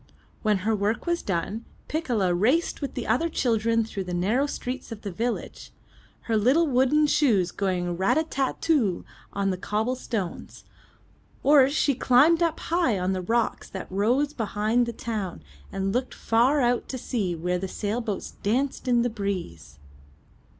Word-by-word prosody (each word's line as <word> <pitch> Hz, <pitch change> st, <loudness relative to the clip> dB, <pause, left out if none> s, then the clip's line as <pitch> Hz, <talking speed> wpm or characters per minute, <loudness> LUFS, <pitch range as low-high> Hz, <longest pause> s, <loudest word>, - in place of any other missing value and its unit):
When 210 Hz, -2 st, +2 dB
her 220 Hz, 0 st, +2 dB
work 210 Hz, +2 st, -1 dB
was 345 Hz, 0 st, 0 dB
done, 195 Hz, +4 st, -2 dB, 0.2 s
Piccola 240 Hz, -, 0 dB
raced 255 Hz, -, +1 dB
with 280 Hz, -, -4 dB
the 245 Hz, -, -3 dB
other 280 Hz, +10 st, +1 dB
children 230 Hz, -5 st, +1 dB
through 195 Hz, -3 st, -5 dB
the 180 Hz, -1 st, -3 dB
narrow 220 Hz, +11 st, +1 dB
streets 255 Hz, -2 st, -5 dB
of 220 Hz, -2 st, -8 dB
the 200 Hz, -, -4 dB
village, 235 Hz, +6 st, -4 dB, 0.5 s
her 225 Hz, -, -1 dB
little 260 Hz, +11 st, +4 dB
wooden 275 Hz, +2 st, +3 dB
shoes 220 Hz, -, +2 dB
going 180 Hz, -3 st, -1 dB
rat 190 Hz, -, +2 dB
a 315 Hz, -, +3 dB
tat 275 Hz, -4 st, -2 dB
too 250 Hz, -, +1 dB, 0.3 s
on 195 Hz, -1 st, 0 dB
the 185 Hz, -, -4 dB
cobble 220 Hz, +6 st, -1 dB
stones, 210 Hz, -8 st, -5 dB, 0.8 s
or 275 Hz, -1 st, +6 dB
she 285 Hz, 0 st, +2 dB
climbed 275 Hz, +7 st, +4 dB
up 330 Hz, -2 st, +1 dB
high 335 Hz, -, +1 dB
on 185 Hz, +1 st, 0 dB
the 185 Hz, -, -2 dB
rocks 230 Hz, +5 st, -1 dB
that 190 Hz, -1 st, -7 dB
rose 245 Hz, +10 st, +1 dB
behind 220 Hz, +1 st, 0 dB
the -, -, -2 dB
town 215 Hz, -6 st, -5 dB, 0.3 s
and 195 Hz, 0 st, -2 dB
looked 255 Hz, +1 st, -2 dB
far 250 Hz, +6 st, +2 dB
out 245 Hz, 0 st, +1 dB
to 260 Hz, -, -3 dB
sea 205 Hz, -8 st, -2 dB
where 180 Hz, +2 st, -1 dB
the 190 Hz, -, -3 dB
sailboats 210 Hz, +1 st, -3 dB
danced 265 Hz, +6 st, -1 dB
in 240 Hz, -1 st, +3 dB
the 245 Hz, -, +1 dB
breeze. 180 Hz, -, -5 dB
230 Hz, 165 wpm, -26 LUFS, 195-265 Hz, 0.8 s, or